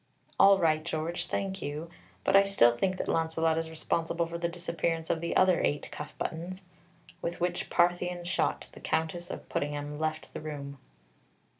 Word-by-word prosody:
"All 195 0 +8
right, 155 -3 +2
George, 165 +1 -2
thank 195 -1 -2
you; 150 +3 -4 0.3
but - - +3
I 195 - +9
still 120 -12 +5
think 185 +8 0
that - - -3
Launcelot 160 0 +1
is 165 0 -4
responsible 165 +1 -1
for 170 0 -5
the 170 0 0
disappearance 170 -1 -2
of 160 - -1
the 170 - -2
other 185 -1 +5
eight 145 - 0
cuff 150 - -7
buttons." 180 +4 -4 0.6
With 170 - -3
which 175 0 -1
Parthian 175 0 +2
shot, 175 - 0
the - - -12
Countess 170 +2 -1
of - - -7
Puddingham 145 0 -3
left 155 0 -2
the - - -5
room. 140 -2 -6
165 Hz, 170 wpm, -30 LUFS, 155-175 Hz, 0.6 s, I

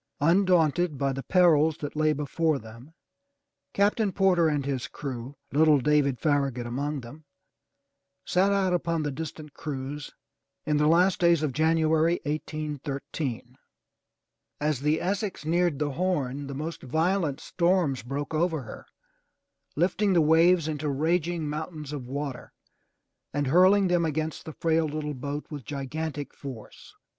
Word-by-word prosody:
Undaunted 175 -1 +3
by 135 0 0
the 135 - -4
perils 160 -3 +4
that 145 -3 -6
lay 155 0 +2
before 150 +2 0
them. 115 +6 -13 0.8
Captain 205 +1 +2
Porter 180 -3 +3
and 145 -3 0
his 135 -1 -2
crew, 130 -1 -6 0.2
little 155 0 +5
David 140 -1 +2
Farragut 140 -5 0
among 140 +4 -3
them, 145 +6 -12 1.0
set 190 +2 +2
out 195 -2 +2
upon 170 -2 0
this 145 -2 -2
distant 155 0 -7
cruise 145 0 -5 0.6
in 150 -1 +1
the 150 0 +3
last 180 +4 +4
days 170 -3 +4
of 145 -4 -1
January, 160 +2 +2
1813. 145 -4 -4 1.0
As 150 -2 0
the 150 +3 +1
Essex 195 -2 -2
neared 170 -1 +1
the 145 0 -1
Horn, 145 -5 -1
the 140 - -6
most 155 +4 -5
violent 160 +2 0
storms 170 -5 +1
broke 140 +5 -5
over 160 -2 0
her, 110 - -10 0.9
lifting 190 +5 +2
the 175 - +4
waves 165 +2 +4
into 150 -1 -2
raging 160 +3 0
mountains 150 -1 -5
of 130 -4 -6
water 140 -1 -5 0.8
and 145 0 +1
hurling 185 +7 +5
them 175 -1 +2
against 155 0 -3
the 160 - -7
frail 160 0 +1
little 150 0 -4
boat 145 +2 -5
with 145 -3 -6
gigantic 145 +2 -5
force. 130 -6 -10
155 Hz, 140 wpm, -27 LUFS, 140-170 Hz, 1.0 s, little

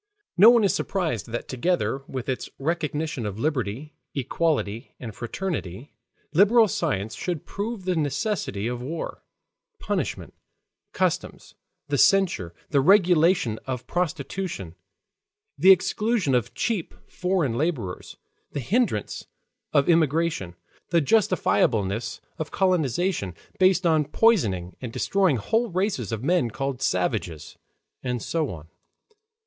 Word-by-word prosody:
No 200 +6 +9
one 235 -2 +5
is 195 - +3
surprised 160 - -2
that 120 +1 -5
together 135 +1 0
with 130 -2 -5
its 130 - -3
recognition 155 -3 -2
of 105 -2 -4
liberty, 130 +1 -2 0.2
equality, 135 -5 -1
and 115 -4 -7
fraternity, 120 - -5 0.4
liberal 215 +6 +6
science 110 - -2
should 165 - -4
prove 205 -1 -5
the 185 -1 +1
necessity 145 - -1
of 120 +1 -3
war, 155 +6 -5 0.5
punishment, - - -3 0.6
customs, - - -2 0.3
the 145 -2 0
censure, 190 - +3 0.2
the 140 -2 +4
regulation 170 - +4
of 130 -1 -4
prostitution, 175 - -3 0.8
the 190 - +4
exclusion 190 - +3
of 120 0 0
cheap 215 -8 -2
foreign 180 -9 0
laborers, 125 - -3 0.4
the - - -2
hindrance 190 - -1 0.4
of 140 -2 +3
emigration, 160 - +1 0.3
the 170 - +4
justifiableness 115 - +1 0.2
of 160 - -3
colonization, 175 - 0 0.2
based 185 0 +4
on 160 -3 +3
poisoning 115 - +2
and 125 -3 -5
destroying 190 - +1
whole 225 - 0
races 180 - -1
of 115 +1 -3
men 165 -6 +2
called 135 +2 -4
savages, 90 - -1 0.5
and 125 -2 -3
so 160 -3 -1
on. 80 -3 -8
150 Hz, 120 wpm, -25 LUFS, 115-185 Hz, 0.8 s, No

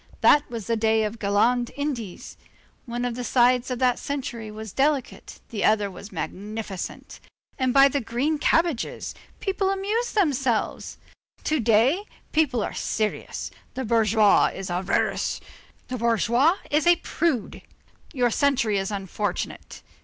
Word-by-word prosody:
That 295 0 +5
was 230 -4 -5
the 230 - 0
day 220 0 +2
of 210 - -1
the - - -12
Galland 235 +4 +2
Indies. 260 -10 -4 0.5
One 240 +1 -3
of 245 - -1
the 250 +1 -5
sides 250 0 +3
of 250 - -2
that 250 -1 +2
century 245 -6 -4
was 215 -1 -8
delicate, 280 -1 -1
the 215 - -3
other 210 -2 +3
was 200 +2 -10
magnificent; 200 +3 -6 0.4
and 260 -1 +2
by 275 +1 +7
the 280 0 -1
green 270 +7 -1
cabbages! 325 -5 0 0.3
people 390 0 0
amused 420 +5 -1
themselves. 270 - 0 0.5
To 310 -1 +1
day, 240 - +3 0.3
people 280 -8 +2
are - - -4
serious. 215 -1 -3 0.2
The 260 0 -3
bourgeois 215 -2 +4
is 190 -2 -5
avaricious, 180 +2 0 0.5
the 255 -1 -4
bourgeoise 235 - +3
is 300 +3 +2
a 345 - +7
prude; 315 -8 -2 0.5
your 245 -5 +1
century 250 -6 +2
is 195 - -2
unfortunate. 200 -1 -4
240 Hz, 140 wpm, -25 LUFS, 215-280 Hz, 0.5 s, by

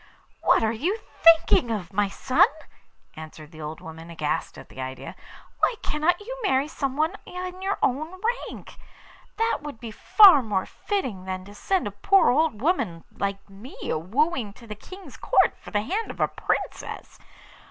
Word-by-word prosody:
'What - - +4
are 220 - +2
you 330 - -1
thinking 330 - +4
of, 200 -4 -4
my 205 0 +1
son?' 255 +6 +3 0.7
answered 155 -1 -10
the 155 -1 -11
old 155 +1 -6
woman, 160 +1 -10
aghast 155 -3 -3
at - - -11
the 130 - -9
idea. 130 0 -7 0.4
'Why - - +2
cannot 310 +4 +1
you 475 +4 -7
marry 280 - +2
someone 305 +3 -1
in 365 0 -6
your 390 +1 -1
own 310 +7 0 0.3
rank? - - -11 0.6
That 455 +1 +1
would 290 -6 -8
be 230 -2 -7
far 375 - +7
more 205 -5 -1
fitting 255 - -4
than 185 0 -5
to 205 - -12
send 375 - -1
a 205 - -3
poor 380 - +4
old 290 -5 +1
woman 220 - 0
like 200 0 -3
me 200 +6 -12
a - - 0
wooing 235 - 0
to 235 - -15
the 215 - -6
King's 375 - -12
Court - - +3
for - - -11
the 205 - 0
hand 405 - -2
of - - -8
a - - +3
Princess. - - -4
245 Hz, 175 wpm, -25 LUFS, -, 0.7 s, far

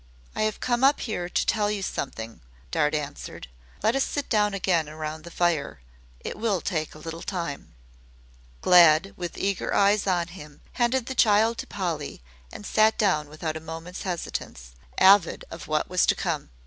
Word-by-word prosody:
"I - - -1
have 215 - -10
come 240 0 0
up 275 +2 +4
here 180 -6 -3
to - - 0
tell 210 -2 +1
you 205 -2 -2
something," 115 -9 -5 0.3
Dart 150 +1 +1
answered. 145 - -6 0.4
"Let 220 +3 +3
us 270 - +2
sit 285 -1 -3
down 210 -2 +2
again 175 -5 +1
round 155 0 -6
the - - -8
fire. 165 - 0 0.4
It - - -6
will 215 -4 +1
take 155 -4 -3
a - - -10
little 165 +2 -7
time." 170 - -5 0.9
Glad 175 +1 +6
with 175 -1 -6
eager 195 -1 -1
eyes 205 +1 +3
on 175 -2 +1
him 150 -5 -12
handed 245 0 +1
the 265 - -4
child 225 -1 +3
to - - -5
Polly 165 - -4 0.3
and 205 - -9
sat 215 +2 +3
down 155 -8 +1
without 155 +1 -4
a - - -4
moment's 165 +3 -8
hesitance, 160 - -5 0.3
avid 190 -2 +5
of 165 -1 -8
what 155 0 0
was 180 -1 +2
to - - +4
come. - - -3
180 Hz, 175 wpm, -26 LUFS, 155-210 Hz, 0.9 s, Glad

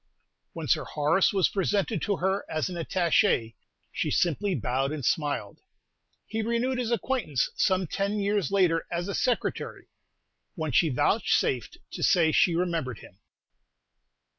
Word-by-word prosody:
When - - -6
Sir - - +2
Horace 150 +5 +2
was 195 -3 +3
presented 200 -1 -1
to 200 -2 0
her 190 +2 0
as 155 +3 -1
an 180 - -6
Attaché, 170 - +1 0.4
she - - -2
simply 180 +3 +1
bowed 135 +2 -1
and 150 -5 -4
smiled. 145 +1 -1 0.7
He 220 0 -3
renewed 235 +3 0
his 240 -2 -1
acquaintance 235 - -1
some 185 -1 +2
ten 200 +5 -2
years 200 -5 0
later 180 -4 +2
as 175 +1 -2
a 200 - -3
Secretary, 245 +3 -2 0.7
when 160 -4 -3
she 160 +6 +3
vouchsafed 125 - +1
to - - -7
say 165 -3 +4
she 170 +2 +3
remembered 165 - -1
him. - - -15
180 Hz, 140 wpm, -27 LUFS, 155-205 Hz, 0.7 s, say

